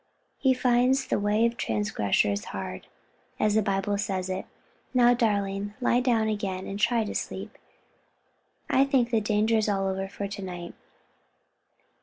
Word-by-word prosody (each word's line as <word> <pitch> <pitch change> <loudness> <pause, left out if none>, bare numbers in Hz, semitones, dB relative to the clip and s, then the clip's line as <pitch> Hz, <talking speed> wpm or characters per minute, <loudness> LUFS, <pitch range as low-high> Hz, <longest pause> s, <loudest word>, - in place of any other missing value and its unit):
he 265 - +3
finds 255 +1 +2
the - - +1
way 210 +2 +2
of 235 0 0
transgressors 105 - 0
hard, 95 -1 -6 0.5
as 215 -1 +2
the 220 - +4
Bible 200 0 -1
says 190 -3 -2
it 185 - -1
is. - - -9 0.5
Now, 245 -1 +6
darling, 205 -3 -1
lie 245 -1 +3
down 235 -3 +2
again 195 -3 -2
and 200 +1 -5
try 230 +1 +2
to 210 - -5
sleep, - - -5 1.1
I 265 - +4
think 265 -4 +2
the 225 -2 +2
danger 215 +2 +2
is 215 -1 +1
all 195 -1 0
over 190 0 -2
for 200 +1 -5
to 200 0 -7
night." 175 -2 -6
205 Hz, 160 wpm, -27 LUFS, 195-235 Hz, 1.1 s, Now